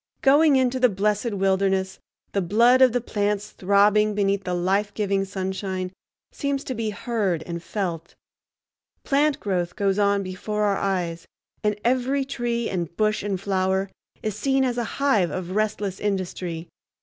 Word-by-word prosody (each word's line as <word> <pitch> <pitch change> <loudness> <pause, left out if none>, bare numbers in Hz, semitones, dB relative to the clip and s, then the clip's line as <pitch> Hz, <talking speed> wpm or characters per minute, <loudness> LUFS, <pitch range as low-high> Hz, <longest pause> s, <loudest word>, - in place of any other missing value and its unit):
Going 290 +2 +6
into 260 -1 +2
the 250 -1 +5
blessed 210 +3 0
wilderness, 190 -1 0 0.3
the 200 - 0
blood 235 +8 +4
of 260 -2 +7
the 245 +1 0
plants 210 -2 -1
throbbing 205 +2 +3
beneath 200 -1 0
the 180 -1 -1
life 195 +4 +1
giving 200 -2 0
sunshine 190 -1 -3 0.4
seems 280 -1 -2
to 260 - -4
be 225 -2 -2
heard 200 -6 -1
and 170 -1 -5
felt; 170 -3 -4 0.9
plant 290 +1 +2
growth 180 -3 -2
goes 200 -1 +1
on 200 -1 +2
before 210 +3 -3
our 200 -2 +2
eyes, 175 -4 -2 0.4
and 210 -1 0
every 260 +3 +1
tree 240 -3 -2
and 170 -3 -4
bush 215 0 +1
and 200 -2 -2
flower 190 0 0 0.3
is 215 -2 -2
seen 270 +4 +1
as 245 -1 -1
a - - 0
hive 245 -11 +3
of 185 -1 -5
restless 210 -3 -1
industry. 180 -4 -3
200 Hz, 155 wpm, -24 LUFS, 190-235 Hz, 0.9 s, of